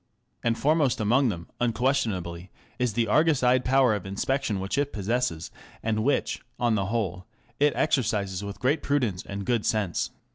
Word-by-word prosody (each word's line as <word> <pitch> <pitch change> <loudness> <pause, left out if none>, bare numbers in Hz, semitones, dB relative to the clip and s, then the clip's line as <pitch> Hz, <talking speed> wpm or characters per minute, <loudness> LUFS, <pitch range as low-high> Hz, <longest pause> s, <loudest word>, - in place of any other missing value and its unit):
And 115 -1 +1
foremost 145 -4 +2
amongst 120 +5 +3
them, 85 -5 -5
unquestionably, 110 -8 -1 0.3
is 125 -3 +1
the 115 +1 +1
Argus 155 0 +3
eyed 125 +1 +4
power 130 -2 +4
of 105 -3 -3
inspection 105 +2 -1
which 95 +8 -2
it 145 0 0
possesses, 100 -5 -2 0.3
and 110 -1 0
which, 140 +4 0 0.2
on 120 -2 +2
the 100 -3 0
whole, 95 -5 -2 0.3
it 145 0 +4
exercises 105 -7 0
with 100 0 -6
great 140 +5 +1
prudence 120 -11 0
and 100 0 -6
good 120 -1 +1
sense. 100 -6 0
115 Hz, 160 wpm, -26 LUFS, 100-130 Hz, 0.3 s, eyed